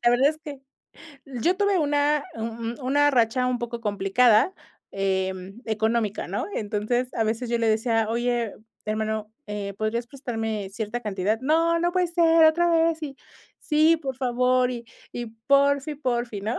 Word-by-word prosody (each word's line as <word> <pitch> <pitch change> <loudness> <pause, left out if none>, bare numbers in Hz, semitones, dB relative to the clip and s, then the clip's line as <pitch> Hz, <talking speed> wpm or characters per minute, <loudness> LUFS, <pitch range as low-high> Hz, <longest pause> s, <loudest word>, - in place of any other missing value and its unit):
la 240 - +6
verdad 260 +4 +4
es 310 0 -3
que, 290 -4 -9 0.6
yo 275 +8 -1
tuve 405 -2 +2
una 290 -1 +1
u 225 - -6
u 230 +3 -5
una 290 +2 +4
racha 250 0 +2
un 250 -1 0
poco 235 0 -5
complicada, 215 - +3 0.4
em, 190 +2 -2
económica, 220 -1 -1
¿no?, - - -2
entonces, 220 +4 -1
a 225 - +1
veces 225 +3 -2
yo 235 - +1
le 230 -1 +1
decía: 225 0 +1
"Oye, 240 -1 -1 0.3
hermano, 215 0 -3
eh, 205 -1 -4
¿podrías 230 +2 -1
prestarme 225 -6 -4
cierta 220 +3 -4
cantidad?, 210 0 -1
no, 330 +4 +2
no 345 +1 +1
puede 360 -1 +1
ser 330 -1 +4
otra 340 +2 +4
vez, 330 -1 +2
y 280 -3 -6 0.4
sí, 310 +2 +3
por 270 -5 -5
favor, 250 0 +2
y 240 -1 -6 0.3
y 240 -1 -5 0.2
porfi, 280 +1 +3
porfi", 240 -7 -2
¿no?, 220 +4 -2
240 Hz, 165 wpm, -25 LUFS, 220-290 Hz, 0.6 s, la